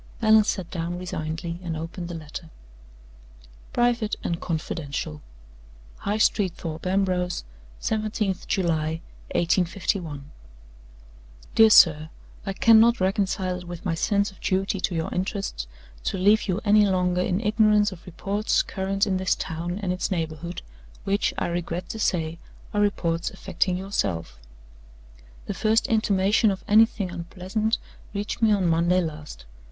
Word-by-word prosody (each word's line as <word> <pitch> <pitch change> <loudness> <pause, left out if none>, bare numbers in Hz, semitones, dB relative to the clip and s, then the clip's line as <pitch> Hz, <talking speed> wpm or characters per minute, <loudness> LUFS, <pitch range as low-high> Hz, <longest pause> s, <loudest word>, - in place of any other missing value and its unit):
Allan 220 -1 +6
sat 190 -4 -2
down 170 0 -3
resignedly, 170 -1 -4
and 165 -3 -4
opened 170 +2 -6
the 175 - -6
letter. 160 +1 -8 1.2
["Private 240 -3 +1
and 170 0 -2
Confidential."] 145 - -4 0.8
"High 205 +1 -2
Street 205 -4 +2
Thorpe 165 +2 -5
Ambrose, 185 -2 0 0.4
17th 215 -3 -1
July, 160 -3 0 0.3
1851. 170 -3 0 1.3
"DEAR 225 0 +7
SIR 155 -6 +6 0.4
I - - 0
cannot 230 +3 +6
reconcile 190 -1 0
it 180 - -11
with 175 +2 -8
my 175 - +1
sense 200 +5 +1
of 195 - -20
duty 195 +1 0
to 185 -1 -1
your 160 0 -2
interests 185 - -3 0.4
to - - -1
leave 205 +4 +4
you 190 +1 -1
any 210 0 +5
longer 180 -1 +1
in 180 +1 0
ignorance 210 -1 +3
of 180 -3 -11
reports 200 +4 0
current 195 +1 -1
in 190 -2 0
this 185 -1 +1
town 170 +3 -4
and 180 -2 0
its 180 - -2
neighborhood, 165 -1 -4 0.4
which, 200 +1 +1
I - - 0
regret 175 0 -3
to 220 - -5
say, 165 -5 0 0.3
are 205 - +2
reports 170 -5 0
affecting 190 -1 -1
yourself. 90 - -2 1.1
"The - - -3
first 220 +1 +2
intimation 210 -1 +3
of 195 -1 -3
anything 215 -3 +4
unpleasant 185 +5 -2 0.4
reached 205 +3 -3
me 220 -1 +5
on 200 -3 +2
Monday 170 +2 +3
last. 150 - -6
185 Hz, 135 wpm, -25 LUFS, 170-205 Hz, 1.3 s, DEAR